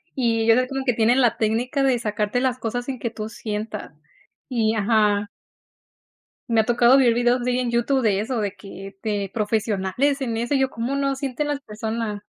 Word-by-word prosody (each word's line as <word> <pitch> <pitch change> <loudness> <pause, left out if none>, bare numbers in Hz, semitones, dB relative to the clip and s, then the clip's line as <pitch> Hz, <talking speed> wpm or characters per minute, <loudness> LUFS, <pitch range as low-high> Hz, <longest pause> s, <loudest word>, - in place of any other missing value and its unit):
Y 230 -3 +1
ellos 225 +1 +5
hacen 255 0 +1
como 270 -1 -3
que 250 - +2
tienen 235 +3 +3
la 240 -3 +3
técnica 240 +6 0
de 265 -2 +3
sacarte 210 +2 -1
las 255 -1 0
cosas 245 0 -3
sin 265 -1 -4
que 235 - -3
tú 215 -1 -6
sientas. 215 -1 -5 0.6
Y, 225 -4 +1
ajá 210 -1 +2 1.2
Me 225 -1 +5
ha - - -4
tocado 240 +2 +5
ver 250 -4 +5
videos 245 +1 +2
de 250 - +1
ahí 250 - 0
en 250 -1 -1
YouTube 240 +3 +1
de 205 -5 +2
eso, 240 +2 -2
de 200 -1 -3
que, 195 -1 -10
de 205 -3 -1
profesionales 215 +5 0
en 245 -4 -2
eso. 240 +5 -1
Y - - +2
yo, 265 0 +1
¿cómo 235 +4 -3
no 275 -1 0
sienten 275 +2 -3
las 290 -1 -1
personas? 220 -2 -4
235 Hz, 205 wpm, -23 LUFS, 215-255 Hz, 1.2 s, ellos